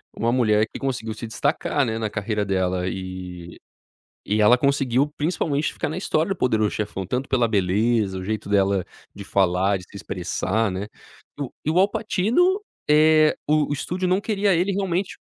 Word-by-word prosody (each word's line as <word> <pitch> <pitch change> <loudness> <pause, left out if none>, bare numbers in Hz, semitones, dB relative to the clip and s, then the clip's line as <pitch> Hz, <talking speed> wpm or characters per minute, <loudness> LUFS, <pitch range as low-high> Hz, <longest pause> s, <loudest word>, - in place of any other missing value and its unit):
uma 115 +1 0
mulher 110 -3 +3
que - - -7
conseguiu 120 -5 -3
se 110 +2 -7
destacar, 145 +3 0
né, 110 -1 -2
na 110 -1 -2
carreira 105 0 -2
dela. 95 -2 0
E 90 -2 -7 0.7
e 105 +2 0
ela 115 +4 +6
conseguiu, 140 +1 +1
principalmente, 150 -2 -1
ficar - - -3
na 155 - -4
história 165 -3 0
do 195 - -1
poderoso 110 -6 +1
chefão, 100 -2 -4
tanto 125 +8 -3
pela 120 -3 +2
beleza, 105 +1 +1
o - - -7
jeito 110 0 -3
dela 100 -2 +2 0.3
de 100 - -9
falar, 95 +1 +2
de - - -11
se - - -13
expressar, 100 +3 -2
né. 95 +2 -4 0.5
E 145 - -2
o 130 - -6
e - - +2
o 165 - +2
Al 195 +2 +5
Pacino, 255 - +1 0.3
eh, 155 +1 +5
o 155 0 +3
o - - 0
estúdio 180 +6 -2
não 185 +2 +2
queria 205 -2 +1
ele 180 +4 +1
realmente 190 -1 -1
115 Hz, 185 wpm, -23 LUFS, 100-155 Hz, 0.7 s, ela